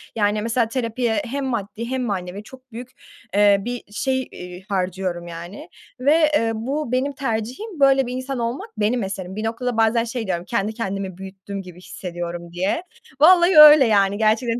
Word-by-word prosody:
Yani, 210 -1 +1
mesela 230 +1 0
terapiye 235 +1 -1
hem 275 +3 -3
maddi 230 -2 -4
hem 260 +1 -2
manevi 195 -2 -4
çok 255 +2 -16
büyük, 245 +2 -8 0.5
eee, 205 -1 +5
bir 245 0 -4
şey, 260 +4 -1
iii, 180 +1 -10
harcıyorum, 185 -2 -2
yani 175 - -9 0.3
ve, 305 +3 +3
eee, 230 -4 +1
bu 260 +4 -3
benim 260 +3 0
tercihim, 265 - -4
böyle 270 -1 +4
bir 250 - -4
insan 260 0 -4
olmak 245 - -3
benim 210 +2 +1
eserim. 190 -1 -6
Bir 215 - -4
noktada 235 +1 -2
bazen 225 +1 +3
şey 235 -2 -5
diyorum, 175 -1 -2
kendi 220 -1 -1
kendimi 195 -4 -4
büyüttüm 195 +1 -8
gibi 180 -2 -12
hissediyorum, 175 -2 -7
diye. 190 - -1 0.4
Vallahi 345 +1 +6
öyle 300 -3 +10
yani, 200 -2 +2
gerçekten. 225 +2 +1
225 Hz, 170 wpm, -21 LUFS, 195-260 Hz, 0.5 s, öyle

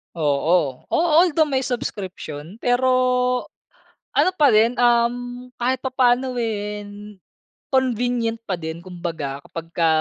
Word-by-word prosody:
Oo, 150 -2 +1
a - - -1 0.2
although 325 -3 +3
may 265 -1 +1
subscription 185 - -5
pero 245 +1 +2 1.3
ano - - +4
pa 295 -4 +5
din. 220 +3 +5
Um, 245 +1 +1
kahit 255 +2 +1
papaano, 255 0 +2
eh, 210 -2 -3 0.9
convenient 245 -3 +1
pa 190 - 0
din, 160 0 -5
kumbaga 170 -6 -5
kapag 165 0 -7
ka 165 -1 +3
230 Hz, 115 wpm, -22 LUFS, 170-250 Hz, 1.3 s, pa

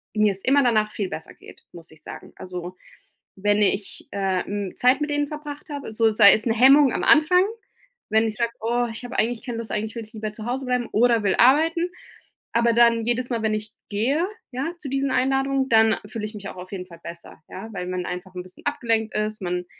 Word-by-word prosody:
mir 215 -1 +3
es 195 - -7
immer 280 +2 +4
danach 215 -3 +2
viel 200 -3 -3
besser 160 - -8
geht, - - -16
muss 170 -1 -13
ich 155 -1 -18
sagen. - - -10
Also, 180 0 -7 0.6
wenn 205 +2 +1
ich, 200 0 -1
äh, 190 -2 -1
hm, 200 -2 -4
Zeit 255 +2 +4
mit 295 - -1
denen 290 0 0
verbracht 300 0 -8
habe 285 -6 -6
so 225 0 +3
sei 210 -2 +8
es 215 - +1
'ne 225 - +2
Hemmung 270 +3 +6
am - - -2
Anfang, 330 +3 +5 0.7
wenn 220 +1 +3
ich 215 - -4
sage: 235 +1 -1
„Oh, 240 +2 0
ich 225 +3 -8
habe 245 +1 -6
eigentlich 230 +1 -1
keine 240 -3 -4
Lust, 230 - -7
eigentlich 215 +2 -3
will 230 - -5
ich 215 - -22
lieber 215 -1 -5
zu 215 0 -9
Hause 260 +3 -3
bleiben 250 -1 -1
oder 230 0 +3
will 195 -2 +2
arbeiten." 325 +7 +4 0.6
Aber 235 0 +3
dann, 230 -1 +4
jedes 240 +1 -1
Mal, 235 -3 -2
wenn 220 -1 +1
ich 215 0 -5 0.2
gehe, 255 - 0 0.3
ja, 270 +7 -3
zu 285 - -6
diesen 275 +1 -1
Einladungen, 270 +1 +1
dann 225 -1 +5
fühle 210 0 -5
ich 215 - -7
mich 200 -1 -7
auch - - -10
auf 180 0 -10
jeden 185 -2 -5
Fall 170 -2 -14
besser, 170 -1 -11
ja, 210 +4 -8
weil 180 -2 -5
man 180 -1 -3
einfach 180 +1 -7
'n 180 - -5
bisschen 185 0 -16
abgelenkt 225 -2 -1
ist, 215 0 -2
man 180 -1 -3
225 Hz, 225 wpm, -23 LUFS, 205-255 Hz, 0.7 s, sei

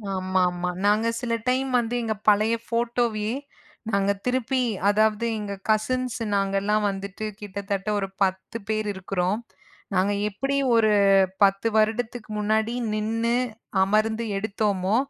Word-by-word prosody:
ஆமாமா. 180 -1 0 0.2
நாங்க 215 +2 +3
சில 235 -1 -1
டைம் 260 +1 +1
வந்து 240 +1 -2
எங்க 220 -1 0 0.2
பழைய 215 +2 +3
ஃபோட்டோவயே 230 -1 0 0.5
நாங்க 200 -1 +2
திருப்பி, 255 +1 +1 0.3
அதாவது 215 +2 +2
எங்க 205 -1 -4 0.2
கசின்ஸ் 250 +3 +1 0.2
நாங்கல்லாம் 200 +2 +1
வந்துட்டு 200 +2 -5
கிட்டத்தட்ட 200 0 -4
ஒரு 195 - -2 0.2
10 190 +4 -2
பேர் 215 -1 -1
இருக்குறோம். 190 +1 -1 0.5
நாங்க 190 +2 +2 0.2
எப்டி 270 +7 -2 0.2
ஒரு 220 -2 +4 0.5
10 195 +3 +3
வருடத்துக்கு 220 +1 0
முன்னாடி 220 +2 +1 0.2
நின்னு 225 +2 0 0.5
அமர்ந்து 220 +3 +1
எடுத்தோமோ, 200 -1 0
215 Hz, 115 wpm, -25 LUFS, 195-230 Hz, 0.5 s, ஒரு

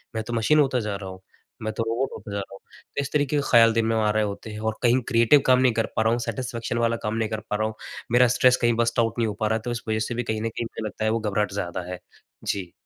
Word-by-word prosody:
मैं 110 - -1
तो 120 - -4
मशीन 115 +7 +3
होता 135 -3 +3
जा 105 -3 -3
रहा 95 -1 -6
हूँ, 95 0 -10 0.4
मैं 110 - -1
तो 115 - -1
रोबोट 115 +4 -1
होता 105 - -9
जा 100 - -2
रहा 100 0 -7
हूँ। 100 - -11 0.4
तो - - +1
इस 140 - -5
तरीके 145 -1 +1
के - - +2
ख़्याल 115 -2 +6
दिन 115 0 +1
में 115 0 +1
आ 110 -1 +2
रहे 110 0 +1
होते 105 +1 -5
हैं 105 - -7
और 110 0 -2
कहीं 125 +1 +4
क्रिएटिव 115 +3 +5
काम 130 -1 +5
नहीं 130 -2 +3
कर 115 0 +1
पा - - +2
रहा 110 0 +3
हूँ, 120 - +1
सैटिस्फैक्शन 115 0 -3
वाला 115 0 +2
काम 105 0 -1
नहीं 110 -1 -1
कर 110 - -3
पा - - 0
रहा 110 +1 0
हूँ। 110 - -5 0.4
मेरा 125 +1 +6
स्ट्रेस 125 0 +5
कहीं 120 0 +3
बर्स्ट 115 0 +1
आउट 115 0 +1
नहीं 115 - +2
हो 105 - -2
पा 110 - +1
रहा 110 - +1
है - - -7
तो 120 - -2
इस 120 0 -3
वजह 110 0 0
से 120 - -3
भी 120 - -1
कहीं 110 -2 -2
न 115 - -1
कहीं 115 - -4
मुझे 110 - -6
लगता 110 0 -5
है - - +3
वो 115 - +1
घबराहट 105 -1 -1
ज़्यादा 90 -2 -3
है। 90 - -5 0.5
जी। 95 -3 -2
115 Hz, 315 wpm, -24 LUFS, 110-120 Hz, 0.5 s, ख़्याल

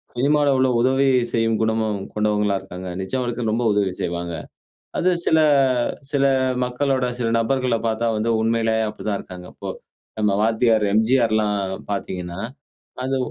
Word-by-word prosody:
சினிமால 145 +3 +2
உள்ள 130 0 +3
உதவி 135 +2 +3 0.3
செய்யும் 115 -1 +1
குணமும் 110 -2 0 0.2
கொண்டவங்களா 105 -2 +1
இருக்காங்க. 95 -1 -8
நிஜ 95 - -7
வாழ்க்கையில 120 -2 -2
ரொம்ப 120 +1 0
உதவி 100 -2 +1
செய்வாங்க. 85 0 -3 0.7
அது 185 - +3 0.2
சில 160 - +4 0.7
சில 140 -2 +1 0.4
மக்களோட 130 +1 0
சில 115 -2 0
நபர்கள 125 +1 +1
பார்த்தா 115 +1 0
வந்து 110 +2 -1
உண்மையிலேயே 115 0 +1
அப்டிதான் 105 -1 -3
இருக்காங்க 90 -1 -10
அப்போ. - - -6 0.5
நம்ம 105 -2 +2
வாத்தியார் 110 -1 +3
எம்ஜிஆர்லாம் 110 -4 +2 0.2
பார்த்தீங்கன்னா 90 -2 -5 0.7
அது 135 0 0
110 Hz, 130 wpm, -22 LUFS, 105-125 Hz, 0.7 s, சில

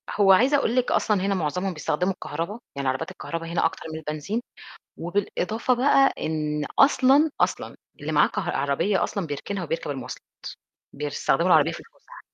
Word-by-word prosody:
هو 200 -2 +4
عايزة 255 +9 +5
أقول 245 -4 0
لِك 255 -1 +1
أصلًا 210 -3 +2
هنا 200 0 +1
معظمهم 180 +3 -2
بيستخدموا 180 +4 -1
الكهربا، 170 +5 -5 0.2
يعني 140 -1 -3
عربيات 130 +1 -3
الكهربا 165 0 -6
هنا 170 0 0
أكتر 165 - -2
من 160 - -5
البنزين 155 +9 -3 0.6
وبالإضافة 205 +6 -1
بقى 270 +2 +4
إن 150 -1 -2
أصلًا، 275 +2 +5
أصلًا - - -1 0.2
اللي - - -4
معاه - - +5
كه - - -3
عربية 140 +9 0
أصلًا 195 -5 -3
بيركنها 175 +7 -4
وبيركب 165 -2 -3
المواصلات، 135 -3 -7 0.7
بيستخدموا 145 +2 0
العربية 160 -2 +5
في - - -8
الفُسح. - - -17
180 Hz, 160 wpm, -25 LUFS, 150-215 Hz, 0.7 s, عايزة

